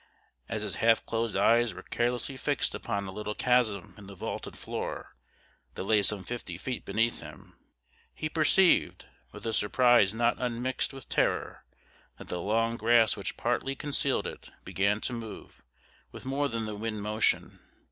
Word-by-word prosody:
As 110 -1 -2
his 105 - -4
half 115 0 +3
closed 115 -1 -1
eyes 115 +3 +3
were - - -9
carelessly 120 +3 -1
fixed 145 +2 0
upon 100 0 -3
a 95 - -6
little 105 +1 -4
chasm 120 -6 +1
in 100 - -12
the 100 - -10
vaulted - - -5
floor, - - -5 0.6
that - - -4
lay 105 +1 +3
some 100 -1 +2
fifty 105 -8 -6
feet 125 +6 -4
beneath 115 +4 +1
him, - - -12 0.6
he 155 - -4
perceived, 165 +4 +3 0.3
with - - -11
a 115 - -1
surprise 120 -1 +4
not 120 +2 +1
unmixed 125 +1 0
with 135 -3 -11
terror, - - 0 0.5
that - - -11
the 90 - -3
long 115 +4 +1
grass 115 0 +4
which 100 - -4
partly 120 +3 -1
concealed 145 0 0
it - - -7 0.2
began 100 +2 +1
to 125 - -3
move 115 -10 -8 0.5
with - - -11
more 140 +2 0
than 115 -2 -3
the 110 - -4
wind 110 0 -4
motion. 110 +1 +1
115 Hz, 165 wpm, -29 LUFS, 105-125 Hz, 0.6 s, surprise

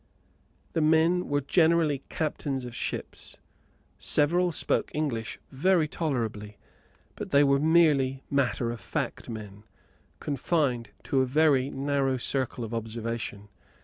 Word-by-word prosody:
The 165 - +1
men 160 +3 +3
were 145 0 +1
generally 160 -1 +2
captains 140 -4 -3
of 120 - -8
ships. - - -5 0.6
Several 175 +4 +3
spoke - - 0
English 120 -7 -2
very 165 +3 +2
tolerably, 115 -10 -3 0.6
but - - -6
they 140 0 +5
were 140 -1 +3
merely 145 -4 +3
matter 130 -4 0
of 120 - -6
fact 95 +5 -4
men, 105 -2 -8 0.6
confined 140 -5 -1
to 135 - +1
a 130 - +1
very 140 -1 +3
narrow 135 -1 0
circle 130 -1 0
of 115 0 -6
observation. 115 -2 -4
140 Hz, 120 wpm, -27 LUFS, 120-155 Hz, 0.6 s, they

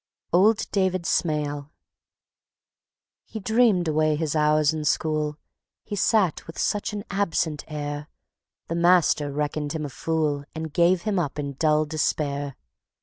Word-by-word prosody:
Old 210 +5 +4
David 185 -3 +1
Smail 150 -4 -1 1.5
He 220 - -7
dreamed 220 -4 +3
away 155 0 +2
his 155 0 -2
hours 150 0 +3
in 155 -1 -3
school; 150 0 0 0.5
He 210 - -5
sat 200 -4 +1
with 165 - -10
such 205 +1 -1
an 205 -1 -5
absent 165 -6 -1
air, 145 -1 -5 0.6
The - - -3
master 170 -4 +3
reckoned 150 +1 -2
him 155 -2 -3
a - - -5
fool, 150 -1 -1
And 160 -1 -5
gave 175 +2 +3
him 210 -3 0
up 145 -4 -2
in 140 -1 -3
dull 155 +2 +2
despair. 145 -2 -1
155 Hz, 140 wpm, -25 LUFS, 150-180 Hz, 1.5 s, Old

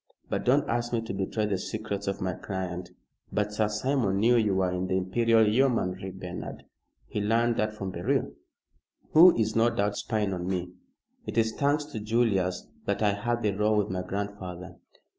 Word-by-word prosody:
But - - -1
don't 135 +4 +3
ask 120 0 -1
me 115 - +1
to 110 -3 -5
betray 100 +3 -1
the 100 -3 -1
secrets 100 -1 -4
of 100 - -2
my 95 0 -1
client. 90 -2 -5 0.4
But 105 0 -1
Sir 105 0 +1
Simon 105 -2 0
knew 115 +4 +4
you 105 -4 +2
were 95 -1 +1
in 90 +1 -2
the 95 - +1
Imperial 110 +4 +3
Yeomanry, 105 -6 +1
Bernard. 90 -1 -7 0.4
He 105 - -3
learned 115 +3 +2
that 110 0 +1
from 95 -3 -4
Beryl." 85 -1 0 0.8
"Who 170 +3 +8
is, 110 -1 0
no 115 +1 +4
doubt, 105 -3 0
spying 105 -3 -1
on 90 -1 -4
me. 90 -1 -2 0.6
It - - -4
is 110 -1 +2
thanks 145 +3 +1
to 145 -7 -6
Julius 105 -5 +1 0.2
that - - 0
I 105 -1 +3
had 120 +4 -2
the 105 - +2
row 105 +2 +1
with 105 -3 0
my 90 0 -2
grandfather. 95 -2 -5
105 Hz, 185 wpm, -28 LUFS, 95-115 Hz, 0.8 s, Who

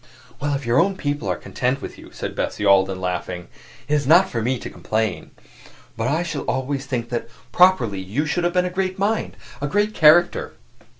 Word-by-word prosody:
"Well, 145 0 -1
if 135 -2 -5
your 120 +2 +3
own 195 0 +2
people 145 - -2
are 90 - 0
content 125 - -2
with - - -8
you," - - -13
said - - -5
Bessie 105 - -2
Alden, 95 -1 +4
laughing, 90 -1 -4 0.4
"it 150 - -1
is 145 -3 +1
not 175 +5 +6
for 115 -10 -3
me 125 +3 0
to - - -7
complain. 110 -4 -2 0.7
But 115 +1 -2
I 155 +6 +1
shall 160 -4 -4
always 135 +1 -2
think 120 -3 -3
that, 120 -1 -3 0.2
properly, 155 - +4
you 105 +11 -2
should 175 +4 -1
have 175 0 +1
been 180 0 +2
a 180 - -3
great 185 0 -2
mind 205 +3 -1 0.2
a 145 - -1
great 205 +7 +1
character." 170 +1 +4
140 Hz, 200 wpm, -22 LUFS, 110-175 Hz, 0.7 s, not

